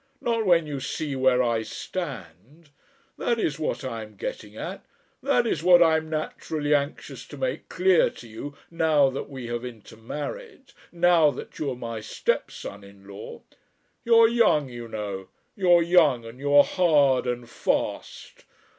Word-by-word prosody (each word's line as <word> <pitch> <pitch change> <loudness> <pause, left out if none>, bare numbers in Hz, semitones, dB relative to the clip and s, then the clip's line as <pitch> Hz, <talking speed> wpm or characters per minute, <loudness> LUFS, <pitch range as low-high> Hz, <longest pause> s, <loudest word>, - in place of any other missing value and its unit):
Not 230 -3 -1
when 170 -3 +4
you 145 -2 -4
see 140 +2 -4
where 130 -1 +3
I 115 -2 +1
stand. 135 - -7 0.5
That 235 - 0
is 155 -7 -1
what 155 - -2
I 115 -4 -4
am 105 -1 -11
getting - - -6
at. - - -6 0.4
That - - +2
is - - -1
what 175 0 +7
I 160 -1 +4
am 160 0 -5
naturally 155 -1 -2
anxious 145 0 -2
to - - -10
make - - -3
clear 185 -5 +3
to 120 - -13
you 140 +6 -8
now 155 -5 +3
that 135 - -6
we 130 -3 -7
have 120 0 -3
intermarried, 145 - -8 0.2
now 170 -3 +4
that 140 - -8
you 150 - -1
are 130 - -3
my 115 -2 -5
stepson 100 -1 -3
in 100 0 -16
law. 100 -1 -10 0.6
You're 230 -1 +6
young, 225 - +3
you 120 -1 -8
know, 100 -4 -5 0.3
you're 175 -4 +4
young, 160 -9 +4
and 115 +3 -11
you're 145 +1 +5
hard 145 -8 +3
and 120 -1 -3
fast. - - -3
145 Hz, 160 wpm, -25 LUFS, 120-170 Hz, 0.6 s, what